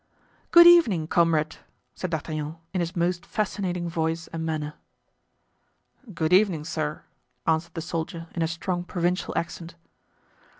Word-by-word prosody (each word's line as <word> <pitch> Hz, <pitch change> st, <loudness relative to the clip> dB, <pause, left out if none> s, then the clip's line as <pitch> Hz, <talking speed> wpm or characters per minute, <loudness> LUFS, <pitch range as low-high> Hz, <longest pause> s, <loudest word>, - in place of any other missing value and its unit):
"Good 345 Hz, 0 st, +9 dB
evening, 280 Hz, -, +6 dB
comrade," 160 Hz, -2 st, +2 dB, 0.4 s
said 185 Hz, -, -4 dB
D'Artagnan 155 Hz, -1 st, -4 dB, 0.2 s
in 185 Hz, -, 0 dB
his 170 Hz, +2 st, -2 dB
most 175 Hz, 0 st, 0 dB
fascinating 190 Hz, -4 st, -2 dB
voice 165 Hz, 0 st, -1 dB
and 165 Hz, 0 st, -5 dB
manner. 155 Hz, -2 st, -3 dB, 1.4 s
"Good 160 Hz, -2 st, 0 dB
evening, 185 Hz, -5 st, +4 dB
sir," 155 Hz, -2 st, -3 dB, 0.4 s
answered 160 Hz, +1 st, 0 dB
the 165 Hz, -, -3 dB
soldier, 165 Hz, 0 st, -4 dB
in 170 Hz, -, -3 dB
a 165 Hz, -, +2 dB
strong 175 Hz, +2 st, -3 dB
provincial 175 Hz, +1 st, -1 dB
accent. 170 Hz, 0 st, -4 dB
170 Hz, 130 wpm, -26 LUFS, 160-180 Hz, 1.4 s, Good